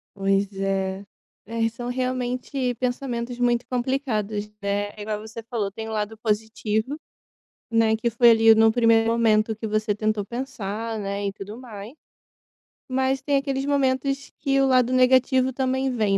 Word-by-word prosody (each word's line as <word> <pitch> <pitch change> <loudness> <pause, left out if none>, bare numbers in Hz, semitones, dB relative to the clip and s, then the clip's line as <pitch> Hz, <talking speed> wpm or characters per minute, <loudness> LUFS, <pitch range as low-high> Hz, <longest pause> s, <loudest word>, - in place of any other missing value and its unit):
Pois 195 0 +1
é. 195 0 -1 0.4
É, 230 +2 -5
e 225 - +2
são 240 +2 -6
realmente 255 0 -2
pensamentos 245 -1 -3
muito 240 0 +2
complicados, 240 -5 -1
né. 205 0 -1
É 210 - -9
igual 210 0 -3
você 220 +2 -8
falou, 225 -3 -2
tem 220 +2 -7
o - - -5
lado 215 0 -3
positivo, 220 +3 -1 0.7
né, 225 -1 +3
que 235 +2 -1
foi 235 +1 +6
ali, 225 0 +6
no 225 0 +5
primeiro 230 -1 +4
momento 220 -1 +2
que 220 +1 -5
você 215 0 0
tentou 215 0 -1
pensar, 230 -3 -4
né, 200 0 -3
e 195 - -3
tudo 205 +3 -8
mais. 220 -2 -9 0.9
Mas 265 +1 0
tem 285 - 0
aqueles 275 -1 -1
momentos 275 0 0
que 275 -1 +2
o 270 - +3
lado 255 -1 +3
negativo 255 0 +4
também 265 +1 0
vem, 215 -5 +1
230 Hz, 160 wpm, -24 LUFS, 215-255 Hz, 0.9 s, foi